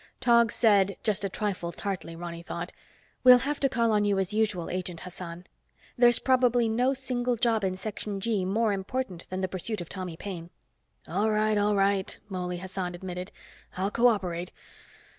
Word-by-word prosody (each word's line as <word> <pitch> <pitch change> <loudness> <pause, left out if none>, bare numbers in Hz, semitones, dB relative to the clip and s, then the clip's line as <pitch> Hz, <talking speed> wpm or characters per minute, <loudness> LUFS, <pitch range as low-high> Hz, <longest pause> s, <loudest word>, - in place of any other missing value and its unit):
Tog 235 -2 +4
said, 200 -4 +3
just 210 -2 +1
a 195 - 0
trifle 190 -4 -2
tartly, 180 -4 -4
Ronny 170 0 -6
thought, 170 +1 -5 0.5
"We'll 250 -1 +10
have 285 +4 -2
to 275 - +2
call 230 -2 +2
on 210 -1 +3
you, 205 -1 +2
as 190 +1 -1
usual, 210 -6 0
Agent 180 -2 -4
Hassan. 180 -1 -8 0.5
There's 240 -1 +6
probably 245 -2 +3
no 250 +5 +2
single 250 -2 -1
job 225 -2 +1
in 185 -1 0
Section 205 0 -4
G 210 -2 0
more 210 +3 +1
important 195 -2 -4
than 185 0 -3
the 185 - 0
pursuit 190 +4 -4
of 175 - -7
Tommy 185 -4 -5
Paine." 175 -3 -6 0.6
"All 200 +7 +1
right, 215 0 +2
all 205 0 +2
right," 195 -1 +1
Mouley 180 -2 -3
Hassan 185 -1 -4
admitted. 180 +1 -6 0.5
"I'll 195 +2 0
co 240 +2 +4
operate. 180 -6 -1
200 Hz, 175 wpm, -28 LUFS, 180-230 Hz, 0.6 s, We'll